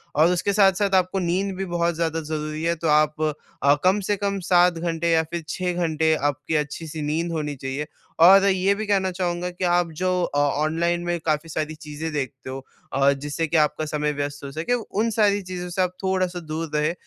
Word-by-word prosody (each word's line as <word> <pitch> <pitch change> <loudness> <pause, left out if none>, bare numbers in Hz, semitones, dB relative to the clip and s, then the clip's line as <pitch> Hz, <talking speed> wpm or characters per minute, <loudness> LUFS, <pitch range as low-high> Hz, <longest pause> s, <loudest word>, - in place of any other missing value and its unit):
और 160 +4 +5
उसके 180 +3 0
साथ-साथ 195 0 +3
आपको 185 +1 +2
नींद 185 +2 -1
भी 195 +1 -3
बहुत 170 -1 0
ज़्यादा 165 0 -1
ज़रूरी 155 0 -4
है। 170 0 +1
तो 165 0 -3
आप 150 0 +3 0.5
अ, 145 - +7
कम 190 +3 +4
से 205 - +3
कम 200 0 -1
7 180 0 +5
घंटे 170 0 -1
या 160 0 +4
फिर 170 -1 -3
6 180 +1 -2
घंटे 160 -2 +1
आपकी 145 +1 -1
अच्छी-सी 150 +1 -3
नींद 160 +3 -1
होनी 150 -3 -3
चाहिए 135 +3 -4 0.4
और 195 +2 +8
ये 195 0 +2
भी 215 +1 -4
कहना 190 -2 +1
चाहूँगा 175 -1 -2
कि 180 +1 -7
आप 175 -1 +2
जो 185 0 +2
अ, 145 - -2
ऑनलाइन 160 +4 +1
में 175 0 -1
काफ़ी 155 +1 0
सारी 155 0 -3
चीज़ें 155 +1 -6
देखते 135 -2 -4
हो 135 0 -7 0.3
अ, 140 +1 +4
जिससे 145 +3 -3
कि 165 - +1
आपका 155 0 +1
समय 150 0 -1
व्यस्त 145 0 -4
हो 140 - -6
सके, 160 - -2
उन 230 -1 -1
सारी 205 -1 +3
चीज़ों 180 -1 -6
से 175 +2 -1
आप 180 0 -1
थोड़ा-सा 185 -1 0
दूर 160 0 -5
रहें, 150 +2 +1
165 Hz, 205 wpm, -23 LUFS, 150-185 Hz, 0.5 s, और